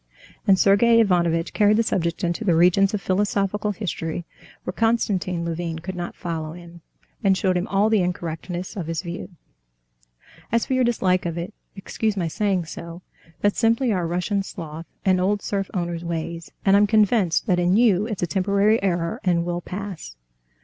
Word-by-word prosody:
And 195 Hz, -1 st, +6 dB
Sergey 230 Hz, +5 st, +5 dB
Ivanovitch 170 Hz, -5 st, +2 dB
carried 210 Hz, 0 st, +4 dB
the 230 Hz, -, +3 dB
subject 170 Hz, -3 st, -1 dB
into 175 Hz, +5 st, -1 dB
the 180 Hz, -6 st, +3 dB
regions 180 Hz, +4 st, +4 dB
of 200 Hz, -, -5 dB
philosophical 205 Hz, +1 st, 0 dB
history 175 Hz, -4 st, -4 dB, 0.4 s
where -, -, -3 dB
Konstantin 195 Hz, -6 st, 0 dB
Levin 165 Hz, 0 st, -3 dB
could 180 Hz, +4 st, -6 dB
not 175 Hz, -1 st, -5 dB
follow 160 Hz, -3 st, -4 dB
him, 170 Hz, 0 st, -12 dB, 0.4 s
and 195 Hz, -2 st, +4 dB
showed 185 Hz, -1 st, +1 dB
him 180 Hz, +2 st, -1 dB
all 200 Hz, +2 st, +2 dB
the 220 Hz, -3 st, +3 dB
incorrectness 175 Hz, +1 st, -4 dB
of 180 Hz, -6 st, -4 dB
his 165 Hz, +1 st, -3 dB
view. 175 Hz, 0 st, -6 dB, 1.2 s
"As 230 Hz, 0 st, +2 dB
for -, -, -2 dB
your 255 Hz, 0 st, +3 dB
dislike 185 Hz, -7 st, +1 dB
of 170 Hz, 0 st, -4 dB
it, 175 Hz, +4 st, -5 dB, 0.2 s
excuse 210 Hz, +1 st, -2 dB
my 175 Hz, -3 st, 0 dB
saying 190 Hz, 0 st, 0 dB
so, 170 Hz, +2 st, -9 dB, 0.4 s
that's 205 Hz, 0 st, +1 dB
simply 230 Hz, +1 st, +2 dB
our 180 Hz, -3 st, -1 dB
Russian 180 Hz, +4 st, -1 dB
sloth 165 Hz, -4 st, -8 dB, 0.2 s
and 185 Hz, -1 st, +3 dB
old 200 Hz, +2 st, 0 dB
serf 195 Hz, -1 st, -2 dB
owner's 175 Hz, -3 st, -3 dB
ways, 170 Hz, 0 st, -4 dB
and 195 Hz, 0 st, +5 dB
I'm 205 Hz, +1 st, +5 dB
convinced 210 Hz, -5 st, +3 dB
that 180 Hz, -3 st, +2 dB
in 180 Hz, +3 st, +3 dB
you 215 Hz, -4 st, +3 dB
it's 215 Hz, -6 st, -4 dB
a -, -, +4 dB
temporary 200 Hz, +6 st, +2 dB
error 170 Hz, -3 st, -1 dB
and 170 Hz, -2 st, +1 dB
will 175 Hz, 0 st, -2 dB
pass." 185 Hz, -, -7 dB
185 Hz, 175 wpm, -23 LUFS, 170-205 Hz, 1.2 s, And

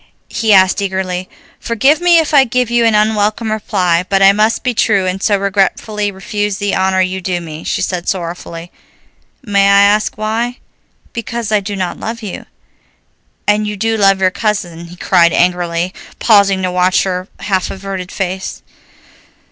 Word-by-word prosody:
he 225 Hz, -1 st, 0 dB
asked 190 Hz, 0 st, +4 dB
eagerly. 190 Hz, -2 st, -3 dB, 0.3 s
"Forgive 265 Hz, +8 st, +1 dB
me 350 Hz, -1 st, +5 dB
if 315 Hz, -2 st, +1 dB
I 280 Hz, -2 st, +7 dB
give 250 Hz, -1 st, -1 dB
you 240 Hz, -1 st, +3 dB
an 225 Hz, -2 st, +3 dB
unwelcome 215 Hz, +1 st, +1 dB
reply, 185 Hz, -5 st, 0 dB
but 195 Hz, -, +2 dB
I 195 Hz, 0 st, +7 dB
must 215 Hz, +3 st, +1 dB
be 250 Hz, -1 st, 0 dB
true, 200 Hz, -4 st, +2 dB
and 185 Hz, +1 st, -2 dB
so 205 Hz, -1 st, +2 dB
regretfully 200 Hz, +1 st, -1 dB
refuse 205 Hz, +1 st, -3 dB
the 205 Hz, 0 st, -2 dB
honor 190 Hz, 0 st, +1 dB
you 185 Hz, 0 st, -2 dB
do 180 Hz, -1 st, -2 dB
me," 160 Hz, -2 st, -8 dB
she -, -, -2 dB
said 180 Hz, -2 st, -3 dB
sorrowfully. 170 Hz, -1 st, -5 dB, 0.7 s
"May 200 Hz, -4 st, +2 dB
I 200 Hz, 0 st, +6 dB
ask 210 Hz, +1 st, +2 dB
why?" 225 Hz, +3 st, -2 dB, 0.6 s
"Because 230 Hz, -1 st, -4 dB
I 210 Hz, -, +3 dB
do 200 Hz, +1 st, -5 dB
not 185 Hz, -3 st, -4 dB
love 230 Hz, +1 st, -5 dB
you." 200 Hz, -, -7 dB, 1.0 s
"And 210 Hz, 0 st, +1 dB
you 210 Hz, 0 st, -4 dB
do 225 Hz, +3 st, 0 dB
love 195 Hz, -2 st, +3 dB
your 185 Hz, -1 st, +2 dB
cousin," 180 Hz, -6 st, -3 dB
he 170 Hz, +1 st, -12 dB
cried 175 Hz, -1 st, +3 dB
angrily, 175 Hz, 0 st, 0 dB, 0.2 s
pausing 200 Hz, -4 st, +3 dB
to 185 Hz, -, -1 dB
watch 180 Hz, +1 st, +2 dB
her 185 Hz, -1 st, -3 dB
half 190 Hz, -3 st, -1 dB
averted 190 Hz, -1 st, -6 dB
face. 190 Hz, -1 st, -4 dB
195 Hz, 170 wpm, -15 LUFS, 185-215 Hz, 1.0 s, I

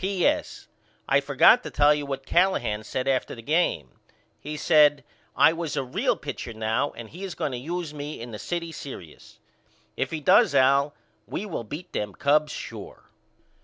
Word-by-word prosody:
P.S. 200 Hz, -, -1 dB, 0.4 s
I -, -, +4 dB
forgot 245 Hz, -, +5 dB
to -, -, -7 dB
tell 145 Hz, +1 st, +4 dB
you 145 Hz, -1 st, -3 dB
what 135 Hz, -1 st, -5 dB
Callahan 175 Hz, -, +1 dB
said 130 Hz, +4 st, -3 dB
after 130 Hz, -2 st, 0 dB
the 115 Hz, -, -11 dB
game. 155 Hz, -, 0 dB, 0.4 s
He 150 Hz, +1 st, -6 dB
said 150 Hz, -3 st, +4 dB, 0.3 s
I 160 Hz, -, +5 dB
was 165 Hz, -3 st, -4 dB
a 135 Hz, -, 0 dB
real 125 Hz, -, 0 dB
pitcher 115 Hz, -, -6 dB
now 110 Hz, +5 st, -1 dB
and 115 Hz, -2 st, -9 dB
he 180 Hz, +5 st, -9 dB
is 190 Hz, -3 st, -5 dB
going 145 Hz, -, -2 dB
to 125 Hz, -, -4 dB
use 165 Hz, +3 st, -4 dB
me 150 Hz, +1 st, -6 dB
in 120 Hz, +1 st, -8 dB
the 105 Hz, -, -7 dB
city 170 Hz, -, -4 dB
serious. 130 Hz, -, -10 dB, 0.6 s
If -, -, -2 dB
he 160 Hz, -, -4 dB
does 195 Hz, +7 st, +4 dB
Al 140 Hz, +2 st, +3 dB, 0.3 s
we 210 Hz, -, -4 dB
will 170 Hz, -, -4 dB
beat 155 Hz, +11 st, -8 dB
them 105 Hz, -1 st, -3 dB
Cubs 150 Hz, +2 st, +2 dB
sure. -, -, -9 dB
145 Hz, 180 wpm, -25 LUFS, 130-170 Hz, 0.6 s, forgot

